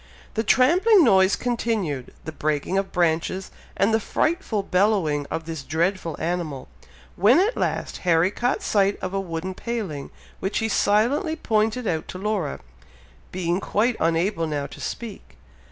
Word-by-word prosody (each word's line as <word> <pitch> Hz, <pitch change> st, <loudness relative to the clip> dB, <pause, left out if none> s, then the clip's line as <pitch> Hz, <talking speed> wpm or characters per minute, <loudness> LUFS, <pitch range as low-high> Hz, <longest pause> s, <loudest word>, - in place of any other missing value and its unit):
The 220 Hz, -, 0 dB
trampling 350 Hz, -, +5 dB
noise 190 Hz, -5 st, +5 dB
continued, 220 Hz, -, -2 dB
the 160 Hz, -, -4 dB
breaking 155 Hz, +3 st, -1 dB
of 195 Hz, -, -4 dB
branches, 175 Hz, +2 st, 0 dB, 0.3 s
and 200 Hz, +3 st, +3 dB
the 220 Hz, -, +4 dB
frightful 305 Hz, -, -1 dB
bellowing 180 Hz, -7 st, +1 dB
of 160 Hz, -, -4 dB
this 160 Hz, -3 st, -5 dB
dreadful 165 Hz, +3 st, -1 dB
animal, 165 Hz, -, -3 dB, 0.5 s
when 215 Hz, -, +5 dB
at 425 Hz, +6 st, +2 dB
last -, -, -2 dB
Harry 175 Hz, +1 st, +2 dB
caught 245 Hz, +4 st, -1 dB
sight 200 Hz, -1 st, +2 dB
of 185 Hz, 0 st, -4 dB
a 195 Hz, -, 0 dB
wooden 180 Hz, 0 st, -4 dB
paling, 190 Hz, -, -4 dB, 0.3 s
which 195 Hz, -, -2 dB
he 225 Hz, -1 st, 0 dB
silently 235 Hz, +11 st, +2 dB
pointed 225 Hz, -2 st, 0 dB
out 160 Hz, -5 st, -1 dB
to -, -, -7 dB
Laura, 195 Hz, -6 st, -2 dB, 0.7 s
being 175 Hz, 0 st, -1 dB
quite 225 Hz, +4 st, +1 dB
unable 165 Hz, +1 st, +1 dB
now 145 Hz, -2 st, -2 dB
to -, -, -10 dB
speak. 230 Hz, -4 st, -7 dB
195 Hz, 150 wpm, -24 LUFS, 165-225 Hz, 0.7 s, trampling